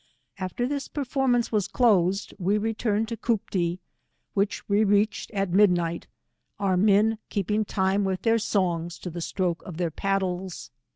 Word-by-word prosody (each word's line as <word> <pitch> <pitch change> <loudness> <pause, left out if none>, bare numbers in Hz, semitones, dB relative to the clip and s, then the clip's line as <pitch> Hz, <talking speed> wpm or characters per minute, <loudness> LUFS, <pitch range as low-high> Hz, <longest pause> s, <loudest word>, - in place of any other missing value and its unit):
After 190 +6 -2
this 280 0 -3
performance 260 -4 0
was 210 -4 +1
closed, 195 -5 +2
we 195 +3 +2
returned 220 0 0
to 230 - -4
Cooptee, 185 -7 -1 0.6
which 200 0 -1
we 205 +1 +3
reached 205 +1 +1
at 195 -3 -2
midnight, 175 -3 +2 0.5
our 195 -2 +1
men 200 +4 +3
M 215 +3 +4
126 - - -16
keeping 210 +2 +1
iitne 195 0 +1
with 190 -1 -2
their 230 0 +3
songs 175 -5 -1
to 180 - -7
the 170 +1 -6
stroke 175 0 -1
of 175 -4 -9
their 170 -2 -1
paddleF. 190 -2 -2
200 Hz, 160 wpm, -26 LUFS, 180-220 Hz, 0.6 s, M